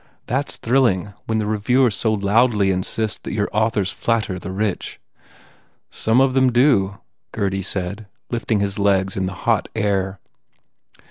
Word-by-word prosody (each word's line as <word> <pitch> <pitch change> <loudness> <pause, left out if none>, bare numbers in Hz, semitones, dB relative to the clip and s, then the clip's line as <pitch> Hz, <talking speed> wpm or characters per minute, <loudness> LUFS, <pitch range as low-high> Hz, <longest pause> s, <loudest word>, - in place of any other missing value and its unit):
That 135 +4 -1
s - - 0
thrilling 115 -6 +1
when 110 - 0
the 110 - 0
reviewers 110 +3 +2
so 110 - 0
loudly 105 0 +2
insist 105 +4 -2
that - - -6
your 105 -2 0
authors 110 -2 +1
flatter 110 -6 -1
the 90 - -7
rich." 100 0 -3 0.9
"Some 115 +3 +2
of 135 -1 +3
them 130 -1 +3
do," 120 -6 +3 0.3
Gurdy 95 -1 -1
said, 100 +2 -4 0.2
lifting 115 -3 0
his 100 0 -2
legs 95 -1 +2
in 95 -1 -1
the 95 - -5
hot - - +1
air. 100 -3 -1
105 Hz, 150 wpm, -21 LUFS, 95-115 Hz, 0.9 s, of